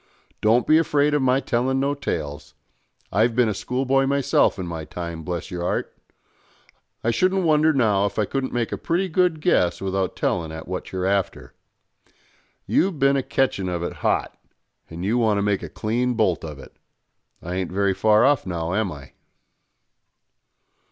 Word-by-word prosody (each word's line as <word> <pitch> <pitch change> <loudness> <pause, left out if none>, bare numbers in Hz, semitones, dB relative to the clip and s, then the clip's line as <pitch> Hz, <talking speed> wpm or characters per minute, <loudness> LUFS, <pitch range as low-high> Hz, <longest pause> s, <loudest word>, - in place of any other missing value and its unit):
Don't 115 +3 +3
be 155 +1 +5
afraid 150 -2 +2
of 150 - +2
my 130 0 +3
telling 130 +1 0
no 140 +1 +1
tales. 75 - -5 0.6
I've 110 +4 +2
bin 125 -2 +3
a 105 - 0
schoolboy 130 +6 0
myself 140 -4 +2
in 95 - -4
my 85 -2 -5
time, 85 +1 -6
bless 85 +2 -5
your 90 -1 -4
'art. - - -2 1.1
I 115 - +2
shouldn't 185 - +1
wonder 155 0 +4
now 105 -8 +2
if 100 - -8
I 105 - +2
couldn't 135 +4 -3
make 120 -2 -1
a - - -4
pretty 180 +3 0
good 175 -2 +1
guess 90 - +2
without 95 -1 -2
telling 80 -2 -1
at 80 0 -8
what 90 +1 -5
you're 95 -1 -2
after. 95 -10 -1 1.1
You've 185 -2 +1
bin 140 0 +3
a 135 - +1
catchin' 125 -8 0
of 85 -1 -3
it - - -5
hot, - - 0 0.5
and 85 +3 -6
you 115 +5 +1
want 110 -3 +2
to 100 - 0
make 100 -1 0
a - - -7
clean 120 +3 -1
bolt 105 -6 +1
of 75 -3 -7
it. 65 - -14 0.7
I 85 - -5
ain't 95 -1 -3
very 100 +1 +1
far 110 +3 +4
off, 145 -1 +3
now, 85 -2 -3
am 105 -2 0
I?" 70 -2 -11
110 Hz, 180 wpm, -23 LUFS, 90-135 Hz, 1.1 s, be